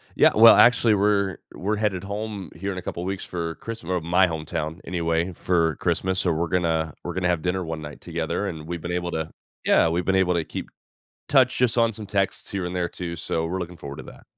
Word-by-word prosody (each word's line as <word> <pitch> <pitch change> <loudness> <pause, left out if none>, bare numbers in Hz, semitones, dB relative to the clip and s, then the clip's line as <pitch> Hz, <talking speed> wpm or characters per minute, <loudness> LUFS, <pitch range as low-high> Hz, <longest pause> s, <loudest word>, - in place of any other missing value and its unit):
Yeah. - - +6
Well, 115 +1 +9
actually, 115 -2 +6
we're 100 -2 +2 0.2
we're 105 +4 -1
headed 105 -3 -1
home 100 -1 -5
here 100 +4 -3
in 90 - -6
a - - -4
couple 85 - -5
weeks 95 +1 -3
for 85 -2 -4
Christm 115 -7 -7
or 90 -1 +1
my 90 +3 +3
hometown 80 0 -4
anyway 85 0 -1
for 85 -3 +1
Christmas. 95 +5 0
So, 90 - +2
we're 85 +1 0
gonna 80 -3 0
we're 90 - -4
gonna 90 0 0
have 85 -2 +1
dinner 90 +1 -1
one 80 -2 -5
night 75 -1 -9
together, 85 +4 -2
and 80 -4 -6
we've 85 -1 -4
been 85 - -4
able 90 0 -2
to 80 0 -3 0.3
Yeah. 80 - +4
We've 85 +2 -1
been 95 - +2
able 95 -1 +3
to 85 - +1
keep - - -6 0.6
touch - - +4
just 125 -1 +2
on 115 -1 +3
some 105 +1 -6
texts 100 -1 -1
here 95 -2 -2
and 90 +1 -4
there 90 -1 -1
too. 85 -1 -5
So, 80 0 -2
we're 95 +3 -2
looking 90 0 -6
forward 70 -2 -8
to - - -7
that. - - -14
90 Hz, 235 wpm, -24 LUFS, 85-95 Hz, 0.6 s, Well